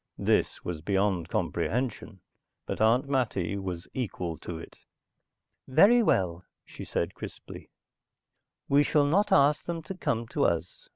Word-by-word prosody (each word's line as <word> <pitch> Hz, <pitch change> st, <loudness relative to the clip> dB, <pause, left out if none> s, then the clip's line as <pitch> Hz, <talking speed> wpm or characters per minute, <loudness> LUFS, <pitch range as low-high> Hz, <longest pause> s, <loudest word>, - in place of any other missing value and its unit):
This -, -, 0 dB
was 85 Hz, -3 st, -4 dB
beyond 95 Hz, -1 st, 0 dB
comprehension. 115 Hz, -5 st, -2 dB, 0.4 s
But -, -, -4 dB
Aunt 120 Hz, +5 st, +3 dB
Mattie 110 Hz, -9 st, 0 dB
was 95 Hz, -3 st, -5 dB
equal 90 Hz, -9 st, -3 dB
to 85 Hz, -, -6 dB
it. 80 Hz, -, -12 dB, 0.9 s
"Very 200 Hz, -, +6 dB
well," 90 Hz, -, +1 dB, 0.2 s
she -, -, -10 dB
said -, -, -2 dB
crisply. -, -, -10 dB, 1.0 s
"We 140 Hz, +1 st, +4 dB
shall 145 Hz, 0 st, +3 dB
not 195 Hz, +9 st, +2 dB
ask 145 Hz, +2 st, +4 dB
them 170 Hz, -2 st, -4 dB
to 190 Hz, -, -6 dB
come 115 Hz, -10 st, -2 dB
to -, -, 0 dB
us. 85 Hz, +1 st, -2 dB
110 Hz, 135 wpm, -28 LUFS, 90-145 Hz, 1.0 s, Very